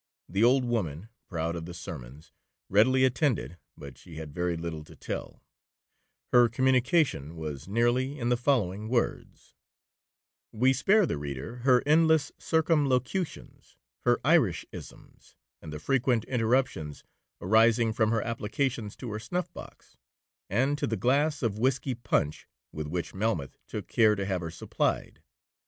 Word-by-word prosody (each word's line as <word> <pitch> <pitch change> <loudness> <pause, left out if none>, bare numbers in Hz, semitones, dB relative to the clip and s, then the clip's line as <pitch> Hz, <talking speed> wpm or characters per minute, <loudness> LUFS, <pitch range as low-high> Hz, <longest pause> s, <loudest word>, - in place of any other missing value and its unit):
The 95 +5 0
old 125 +2 +4
woman, 105 -6 -2 0.2
proud 85 -1 -2
of 85 -1 -6
the 90 - -8
summons, 75 -5 -9 0.4
readily 130 +6 +4
attended, 125 - 0 0.2
but 70 -2 -11
she 80 - -13
had 80 -2 -7
very 90 0 -1
little 80 -2 -5
to - - -15
tell,—her 120 -1 -3
communication 130 - +2
was 75 -2 -6
nearly 120 +6 +1
in 120 -3 -1
the 125 - +4
following 110 -5 0
words: 120 -1 -2 1.0
(We 130 +4 +3
spare 195 - +4
the 75 - -3
reader 70 - -6
her 125 0 +3
endless 160 -1 +4
circumlocutions, 155 +1 -1 0.3
her - - +4
Irishcisms, - - -1 0.3
and 80 - -9
the 75 - -5
frequent 125 - +1
interruptions 115 - 0 0.4
arising 110 +3 +4
from 110 -1 +2
her 115 -1 +1
applications 115 -1 -2
to 120 -4 -7
her 105 - -4
snuff 175 +12 -3
box, - - -12 0.5
and 135 +8 +1
to - - 0
the 110 - -1
glass 145 +7 +1
of 110 -2 -1
whiskey 130 +2 +1
punch 105 -11 -1 0.2
with 75 -1 -5
which 85 +3 -4
Melmoth 95 - -2
took - - -5
care 110 -2 +4
to 100 -1 -3
have 95 -2 -1
her 85 - -4
supplied). - - -2
115 Hz, 140 wpm, -28 LUFS, 85-130 Hz, 1.0 s, old